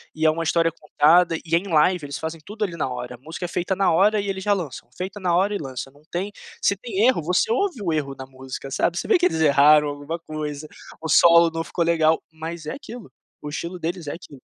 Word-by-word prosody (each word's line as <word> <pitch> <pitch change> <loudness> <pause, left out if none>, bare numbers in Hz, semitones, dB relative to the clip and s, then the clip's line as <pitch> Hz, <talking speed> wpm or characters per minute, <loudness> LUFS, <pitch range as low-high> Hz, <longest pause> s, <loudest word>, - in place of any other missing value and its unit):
e 155 0 -1
é 155 - +7
uma 165 +1 -3
história 165 +1 +2
contada, 165 +2 +3
e 165 - -7
é - - +6
em 195 - -10
live. 160 0 +2
Eles 140 -1 -5
fazem 160 +1 -5
tudo 215 +1 -5
ali 175 -5 -3
na 150 - -1
hora, 125 0 -6
a - - -17
música 160 +7 -8
é 175 - -5
feita 180 +3 -1
na 195 +1 +2
hora 205 +5 +3
e 200 - -4
eles 190 -1 -3
já 205 - +4
lançam, 160 -11 -5
feita 190 +3 -5
na 180 -3 +1
hora 195 +3 +2
e - - 0
lança. 135 -3 -6
Não 145 +2 -23
tem 190 +4 -3 0.3
se 200 - +2
tem 220 0 0
erro 255 -9 +3
você 180 +7 +1
ouve 270 - 0
o 170 - 0
erro 140 -3 -2
na 130 - -7
música, 130 +1 -9
sabe. 175 +5 0
Você - - -3
vê 410 - +6
que 355 - +2
eles 160 - +1
erraram 150 0 +5
alguma 145 +3 -5
coisa, 155 -2 -6 0.3
o 160 - -5
solo 170 +2 +6
não 165 0 -2
ficou 170 - -1
legal, 160 -1 +2
mas 160 0 -7
é 155 - -4
aquilo, 245 -5 -10 0.3
o 150 - -6
estilo 170 +4 -5
deles 170 0 -4
é 145 - -3
aquilo. 150 -5 -12
165 Hz, 255 wpm, -23 LUFS, 150-185 Hz, 0.3 s, é